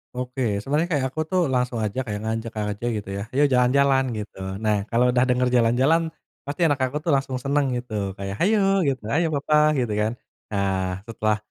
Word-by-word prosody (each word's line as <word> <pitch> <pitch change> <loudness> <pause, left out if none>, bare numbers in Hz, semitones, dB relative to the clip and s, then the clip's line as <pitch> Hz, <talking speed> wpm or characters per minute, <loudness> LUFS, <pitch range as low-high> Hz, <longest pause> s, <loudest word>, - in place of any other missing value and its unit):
Oke, 125 +1 -4 0.2
sebena 140 +9 0
rnya 175 - -2
kayak 140 -4 +1
aku 155 - -1
tuh 185 -1 +2
langsung 125 -1 0
aja 105 +5 -3
kayak 105 -2 -3
ngajak 115 +1 -3 0.2
aja 105 +4 -7
gitu 100 -2 -7
ya - - -3
"Ayo 140 +4 +3
jalan-jalan," 135 +2 +4
gitu. 105 -2 -7 0.3
Nah, 105 -2 +2
kalau 120 +1 +3
udah 125 - +3
denger 125 0 +2
jalan-jalan 125 +8 +3 0.4
pasti 145 +5 -1
anak 145 -4 +1
aku 130 +3 0
tuh 165 - +2
langsung 135 -1 0
seneng 140 +3 0
gitu 120 -2 -7 0.2
kayak, 100 0 -4
"Hayo 195 0 +3
gitu, 130 -5 -4
hayo 165 +2 +2
papa," 150 +1 +3
gitu, 120 -5 0
kan. 110 +1 +1 0.4
Nah, 95 -2 -1
setelah 110 -2 0
125 Hz, 195 wpm, -24 LUFS, 110-145 Hz, 0.4 s, jalan-jalan